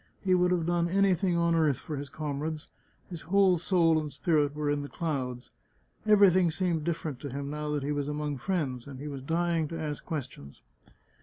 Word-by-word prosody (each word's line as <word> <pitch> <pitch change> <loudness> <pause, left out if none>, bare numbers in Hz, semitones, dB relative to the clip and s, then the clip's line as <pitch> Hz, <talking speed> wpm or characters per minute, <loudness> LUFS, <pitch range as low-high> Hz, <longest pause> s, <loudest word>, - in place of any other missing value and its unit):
He 190 -2 +3
would 180 0 +4
have 175 -3 +1
done 170 0 +1
anything 190 -1 +2
on 170 0 +2
earth 155 -5 +3
for 155 - -6
his 140 0 -6
comrades; 150 +1 -4 0.4
his 170 -3 -6
whole 190 -1 +3
soul 165 -2 +3
and 150 -1 -5
spirit 145 0 +1
were 150 -1 -2
in 145 0 0
the 145 - -7
clouds. 130 -7 -3 0.6
Everything 190 -4 +6
seemed 165 -1 -1
different 155 -5 -3
to 145 - -6
him 140 +2 -5
now 150 0 -4
that 145 -2 -1
he 145 - -1
was 145 -1 -1
among 150 -2 -3
friends, 140 -8 -2
and 135 -2 -9
he 145 - -6
was 140 -2 -6
dying 165 +2 0
to 165 +2 -6
ask 150 -2 -4
questions. 130 - -7
155 Hz, 200 wpm, -29 LUFS, 145-175 Hz, 0.6 s, Everything